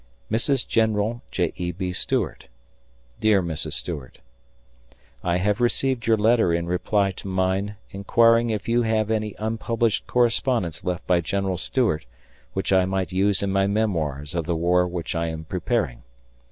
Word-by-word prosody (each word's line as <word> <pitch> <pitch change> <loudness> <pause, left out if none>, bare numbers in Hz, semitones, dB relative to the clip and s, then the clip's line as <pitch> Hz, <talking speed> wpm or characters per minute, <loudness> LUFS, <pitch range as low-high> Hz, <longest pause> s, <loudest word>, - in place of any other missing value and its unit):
Mrs. 120 +3 +1
General 110 +1 +1
J. 90 -3 -1
E. 90 0 -2
B. 90 +1 -4
Stuart: - - -2 0.7
Dear 105 -3 +3
Mrs. 80 -2 -4
Stuart: 70 0 -5 1.1
I 85 0 +1
have 105 +5 0
received 120 0 +1
your 115 -1 +4
letter 110 -3 +3
in 85 0 0
reply 95 +3 +1
to 95 - -9
mine 95 +2 0 0.2
inquiring 115 +4 +3
if 105 -2 -3
you 120 +1 +3
had 110 -1 +1
any 110 -2 -1
unpublished 115 0 -1
correspondence 120 - +1
left 90 -2 -3
by 90 -1 +3
General 95 +2 -1
Stuart 110 - 0 0.5
which 95 0 -1
I 95 -1 +4
might 95 -1 -2
use 95 +1 +2
in 100 - 0
my 95 0 +2
Memoirs 80 -10 -1
of 85 -2 -1
the 85 - 0
war 90 +2 +2
which 85 -2 -4
I 85 -1 -1
am 80 -1 -5
preparing. 90 - -1
95 Hz, 155 wpm, -24 LUFS, 90-110 Hz, 1.1 s, your